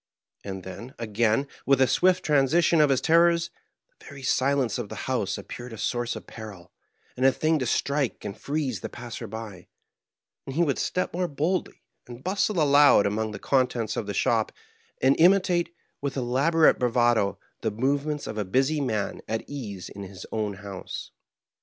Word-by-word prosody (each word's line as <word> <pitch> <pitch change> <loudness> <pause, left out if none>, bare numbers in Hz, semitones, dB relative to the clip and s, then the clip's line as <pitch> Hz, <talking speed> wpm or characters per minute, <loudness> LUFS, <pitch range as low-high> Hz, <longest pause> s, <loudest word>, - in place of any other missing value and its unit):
And 95 -2 -6
then, 115 +8 -9
again, 115 +4 +1 0.2
with 135 -1 +3
a 130 - +6
swift 185 +8 +2
transition 155 +3 +4
of 150 - +4
his 135 -2 +2
terrors, 170 +1 +3 0.5
the - - -18
very 140 -2 -10
silence 130 -3 +1
of 110 -4 -5
the - - -6
house - - -1
appeared 120 -1 -8
a - - -8
source 120 +5 -1
of - - -8
peril, 105 -6 -10 0.4
and 130 - -3
a 135 - +7
thing 155 +3 +1
to 130 - -1
strike 140 +1 -1
and 100 - -4
freeze 140 -7 -2
the - - -6
passer 120 -1 -7
by; 105 -4 -8 0.8
and 135 - -5
he 170 - +3
would 145 -5 0
step 180 - -1
more 180 +1 0
boldly, 165 +5 -2 0.2
and 120 +1 -10
bustle 195 0 0
aloud 145 -6 +6
among 110 +2 -1
the 105 - -6
contents 125 -5 0
of 105 - -3
the 100 - -3
shop, - - +1 0.5
and 135 +1 +5
imitate, 175 -1 +4 0.3
with 140 -1 -3
elaborate 140 +6 +3
bravado, 120 -4 +2 0.2
the 110 - 0
movements 140 +6 -1
of 110 0 -5
a - - +1
busy 135 +10 +1
man 110 -7 -2
at 110 +1 -3
ease 105 -10 -6
in 100 - -9
his 95 -1 -9
own 105 -2 -2
house. 100 -1 -7
130 Hz, 175 wpm, -26 LUFS, 110-150 Hz, 0.8 s, a